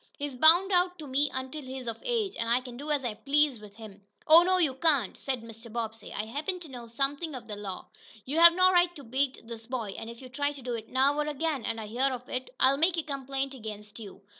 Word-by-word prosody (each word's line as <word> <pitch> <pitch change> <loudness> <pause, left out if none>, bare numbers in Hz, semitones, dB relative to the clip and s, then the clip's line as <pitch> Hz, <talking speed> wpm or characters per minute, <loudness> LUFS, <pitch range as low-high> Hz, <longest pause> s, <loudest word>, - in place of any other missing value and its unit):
He's 290 -2 -3
bound 335 +8 +6
out 360 0 +2
to 310 - -8
me 280 +2 +1
until 260 +4 -5
he's 260 -1 -7
of 230 -1 -4
age, 455 -5 -1
an' 230 - -1
I 235 +2 +3
can 250 -1 -10
do 290 +5 -7
as 290 -3 0
I 235 - -1
please 280 +2 +1
with 210 -1 -13
him." 210 -3 -12 0.2
"Oh, 320 +2 +9
no, 370 +1 +3
you 315 -7 +2
can't," 275 - +1
said 260 -4 -4
Mr. 225 0 -11
Bobbsey. 225 -1 -5
"I 210 - -3
happen 300 - -3
to 325 - -9
know 240 -2 -8
something 280 +6 -2
of 235 -3 -9
the 210 - -5
law. 200 -3 -6 0.4
You 295 +5 -1
have 340 0 +10
no 370 0 +6
right 350 -1 +3
to 285 - -10
beat 265 +1 -1
this 225 -1 -9
boy, 230 -6 -4
and 225 - -7
if 235 0 -10
you 260 - -10
try 285 +3 -1
to 280 - -11
do 245 -1 -3
it 225 -1 -6
now, 270 +2 +3
or 300 - 0
again, 300 -3 -2
and 230 0 -2
I 220 - -5
hear 250 +6 +1
of 250 0 -6
it, 255 0 -4
I'll 270 +1 +5
make 335 +3 +2
a 325 - 0
complaint 275 -1 -3
against 210 -3 -8
you. 205 -2 -11
265 Hz, 260 wpm, -29 LUFS, 230-300 Hz, 0.4 s, have